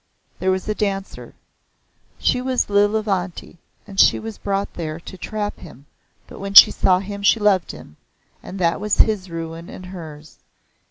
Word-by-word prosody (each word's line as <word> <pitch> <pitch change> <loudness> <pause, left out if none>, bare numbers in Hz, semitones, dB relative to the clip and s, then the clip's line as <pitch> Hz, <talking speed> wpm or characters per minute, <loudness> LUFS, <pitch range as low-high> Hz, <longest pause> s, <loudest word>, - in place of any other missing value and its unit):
"There 190 - 0
was 185 +1 -1
a 215 - 0
Dancer. 195 -2 -4 0.8
She 250 - 0
was 255 -4 -1
Lilavanti, 200 -4 0 0.3
and 195 -2 -7
she - - +6
was 220 -1 -8
brought 200 0 -3
there 160 -1 -5
to 170 - -11
trap 205 +3 -5
him 140 -4 -14 0.4
but - - -13
when 200 0 -6
she - - +11
saw 185 - +2
him 200 +2 -6
she 200 +3 +3
loved 205 -4 +2
him, 75 - -14 0.4
and 195 - -9
that 170 0 0
was 210 -1 0
his 205 -4 +2
ruin 165 0 -7
and 185 - -10
hers. 160 -5 -11
195 Hz, 165 wpm, -21 LUFS, 170-205 Hz, 0.8 s, she